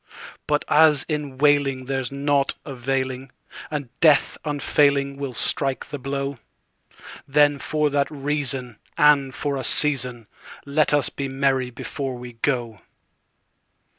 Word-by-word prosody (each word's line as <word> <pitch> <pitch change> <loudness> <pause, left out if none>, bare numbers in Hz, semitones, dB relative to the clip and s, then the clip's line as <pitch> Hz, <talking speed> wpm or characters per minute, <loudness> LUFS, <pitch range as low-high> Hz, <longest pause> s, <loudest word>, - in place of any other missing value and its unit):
But 150 0 0
as 150 -2 +4
in 150 -4 -4
wailing 140 -2 +2
there's 135 -2 -3
nought 140 0 0
availing, 130 -1 -3 0.4
And 145 -5 -4
Death 155 -4 +4
unfailing 140 -1 +1
will 140 -3 -5
strike 135 +2 -1
the 145 - -7
blow, 140 0 -4 0.9
Then 145 0 +3
for 150 0 0
that 140 0 +1
reason, 135 -5 -3 0.2
and 145 -2 +4
for 145 -2 -2
a 130 - -4
season, 125 -4 +2 0.4
Let 145 +2 +2
us 145 -1 +3
be 140 - -5
merry 135 -1 0
before 130 +2 -5
we 125 0 -9
go. 115 -3 -2
140 Hz, 125 wpm, -23 LUFS, 130-145 Hz, 0.9 s, as